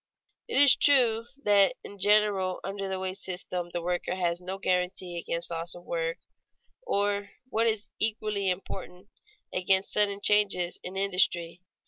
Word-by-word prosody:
It 460 - +1
is 285 -2 +8
true 235 -5 +4 0.2
that 200 -1 +4
in 200 - -11
general 205 -2 +2
under 195 0 -4
the 190 - -2
wage 190 +1 -4
system 180 -2 -4
the 175 -1 -4
worker 180 +1 -2
has 175 -1 -1
no 185 +2 -5
guarantee 180 -1 -1
against 170 0 -2
loss 165 +1 -3
of 175 - -12
work 165 0 -2 0.6
or, 205 - -1 0.2
what 230 -1 +1
is 215 -2 -1
equally 215 -3 0
important, 185 +1 -6 0.4
against 190 +1 +1
sudden 200 -1 +2
changes 200 -4 +2
in 185 - -7
industry. 180 -3 +1
190 Hz, 145 wpm, -28 LUFS, 180-205 Hz, 0.6 s, is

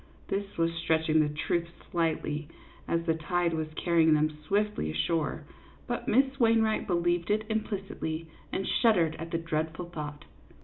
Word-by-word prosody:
This 200 0 -3
was 165 0 +2
stretching 160 -1 +2
the 150 -1 +3
truth 170 +3 -1 0.2
slightly, 155 -3 0 0.4
as 170 0 0
the 165 - +3
tide 170 +1 0
was 160 -1 -1
carrying 165 -2 +4
them 155 0 +1
swiftly 210 - +1
ashore; 155 - 0 0.4
but 240 - -3
Miss 270 +3 +3
Wainwright 225 -2 +3
believed 175 -1 +1
it 215 +1 +1
implicitly, 195 -7 -3 0.3
and 195 - -2
shuddered 180 -9 +3
at 165 +1 -5
the 165 - 0
dreadful 165 +1 -2
thought. 150 -3 -6
165 Hz, 145 wpm, -29 LUFS, 160-195 Hz, 0.4 s, carrying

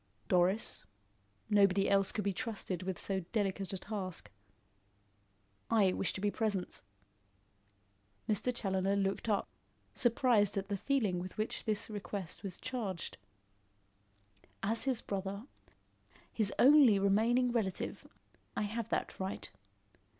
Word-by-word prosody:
"Doris. 185 +4 +2 0.6
Nobody 200 -2 +4
else 195 -1 +4
could 210 - -2
be 200 0 0
trusted 200 -4 -3
with 185 -1 -3
so 195 -1 -2
delicate 195 -3 -1
a 190 - -2
task." 185 - -5 1.4
"I 200 -5 +4
wish 195 - 0
to 190 - -4
be 205 0 +1
present." 205 -5 -2 1.5
Mr. 215 +4 +1
Challoner 195 -4 0
looked 195 +2 -1
up, 205 - +1 0.5
surprised 230 -5 +3
at 195 0 -3
the 200 - 0
feeling 215 -7 0
with 185 +1 -7
which 215 +1 -3
this 215 -1 -1
request 200 -4 -5
was 195 -4 -6
charged. 200 - -4 1.4
"As 225 +5 +4
his 260 -4 0
brother 200 +2 -4 0.9
his 210 -3 +1
only 270 -6 +7
remaining 225 +6 +3
relative, 215 -6 -2 0.5
I - - +1
have 220 +2 -3
that - - -2
right. 190 +1 -4
200 Hz, 120 wpm, -33 LUFS, 190-225 Hz, 1.5 s, only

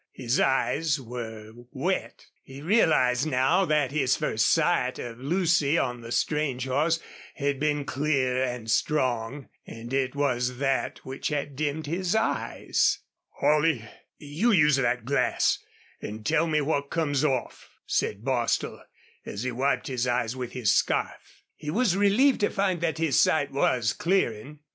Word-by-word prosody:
His 125 0 -1
eyes 145 +3 +1
were 115 -3 -7 0.2
wet. - - -3 0.2
He 135 +1 -12
realized 150 - +3
now 150 +8 +2
that 150 -5 +1
his 135 -3 +2
first 110 0 +1
sight 165 -6 +2
of 120 -1 -7
Lucy 165 0 +2
on 125 -4 -1
the 115 0 -9
strange 140 -3 0
horse 155 +5 +1 0.4
had 140 -2 -1
been 150 -1 0
clear 135 -3 0
and 125 -3 -4
strong, 130 -1 0 0.2
and 115 +2 -8
it 135 0 0
was 125 -3 0
that 135 0 -1
which 130 +1 -4
had 145 -2 -3
dimmed 150 +2 -2
his 175 +5 -1
eyes. 220 0 +1 0.3
"Holley, 150 -6 +1 0.3
you 155 +11 0
use 150 -7 +4
the 125 -2 +1
glass 140 +3 +1 0.4
an' 105 +1 -7
tell 165 +9 +2
me 155 -1 +1
what 140 -1 -1
comes 150 -4 0
off," 135 -5 -2 0.2
said 105 +3 -1
Bostil, 125 -3 -1 0.4
as 105 +3 -6
he 130 - -2
wiped 130 +4 0
his 125 -2 -2
eyes 120 -1 0
with 125 -2 -6
his 120 -5 +2
scarf. - - -2
He 150 - -7
was 210 +2 +2
relieved 205 +8 +3
to 205 - +2
find 190 -4 -1
that 165 -2 -1
his 160 -5 +2
sight 145 -3 +2
was 125 -5 +1
clearing. 150 - -1
140 Hz, 150 wpm, -26 LUFS, 125-155 Hz, 0.4 s, use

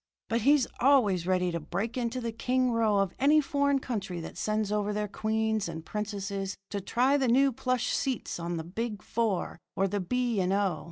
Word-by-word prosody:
But 230 +1 +1
he's 280 +2 +5
always 215 -10 +4
ready 180 -1 +2
to 170 - -2
break 195 +9 -3
into 245 0 -2
the 235 -2 -3
king 255 +2 +1
row 225 -3 +2
of 195 -2 +1
any 295 +3 +5
foreign 280 -1 +1
country 200 -9 -4
that - - -8
sends 215 -1 -1
over 210 0 0
their 210 0 -1
queens 220 -1 -1
and 160 -1 -7
princesses 200 -2 -4
to 200 - -2
try 255 +8 +2
the 265 -2 +1
new 270 +3 +4
plush 250 0 -1
seats 260 -9 -2
on 170 0 -3
the 160 - -3
Big 210 +5 -4
Four 215 -7 -1 0.2
or 195 - +2
the 205 +2 -2
B. 240 +3 0
and 185 0 0
O. 195 -6 +1
215 Hz, 200 wpm, -29 LUFS, 195-250 Hz, 0.2 s, he's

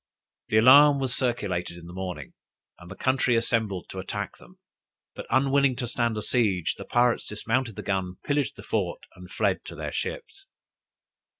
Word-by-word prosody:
The 110 - +2
alarm 140 +5 +7
was 130 -3 -1
circulated 95 -9 -2
in 85 - -12
the 85 - -10
morning, 95 -1 -6 0.5
and 85 - -13
the 95 - -8
country 130 -1 +1
assembled 110 -5 0
to 95 - -6
attack 100 +2 -5
them; 185 - -18 0.6
but, - - -8
unwilling 135 0 +3
to 125 - -3
stand 115 -2 -1
a 105 - -3
siege, 95 -9 +1
the - - -10
pirates 120 0 +2
dismounted 115 +2 -2
the 105 - -7
guns, 95 -2 -2
pillaged 145 -1 0
the - - -11
fort, - - -2
and - - -12
fled - - 0
to - - -8
their - - -5
ships. 440 -5 -5
115 Hz, 175 wpm, -26 LUFS, 95-130 Hz, 0.6 s, alarm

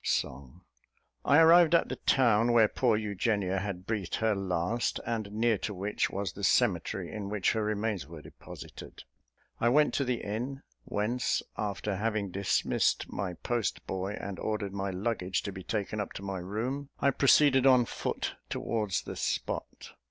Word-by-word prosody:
Song. 65 +6 -2 0.6
I 145 - +5
arrived 165 +1 +7
at - - +3
the - - -2
town 120 -3 +3
where 115 -2 +6
poor 115 0 +1
Eugenia 100 -2 0
had 95 -2 -5
breathed 105 -5 -2
her 110 -1 +1
last, 95 +3 -1
and 110 -3 -3
near 110 0 +1
to 105 - -4
which 100 +3 -1
was 100 -3 -3
the - - -9
cemetery - - +1
in 100 -2 -5
which 105 -2 +1
her 110 - -1
remains 105 -6 -2
were 80 -2 -10
deposited. - - -11 0.6
I 120 - +3
went 150 +4 +4
to 140 - +1
the 125 -2 -2
inn, 125 +7 -4 0.2
whence, 115 +4 -1
after 105 -1 -3
having 105 -2 -1
dismissed 100 +1 0
my 90 -1 -3
post 115 0 -2
boy 95 +2 -3
and 100 -2 -6
ordered 105 -2 -2
my 100 0 -2
luggage 95 -2 -2
to 100 - -4
be 95 -1 -8
taken 105 +4 -3
up 105 - -4
to 100 - -7
my 95 -1 -3
room, 120 +10 -3
I 140 - +3
proceeded 135 0 +5
on 125 -2 +6
foot - - -3 0.2
towards 105 -4 -1
the - - -7
spot. - - -3
105 Hz, 165 wpm, -30 LUFS, 95-120 Hz, 0.6 s, arrived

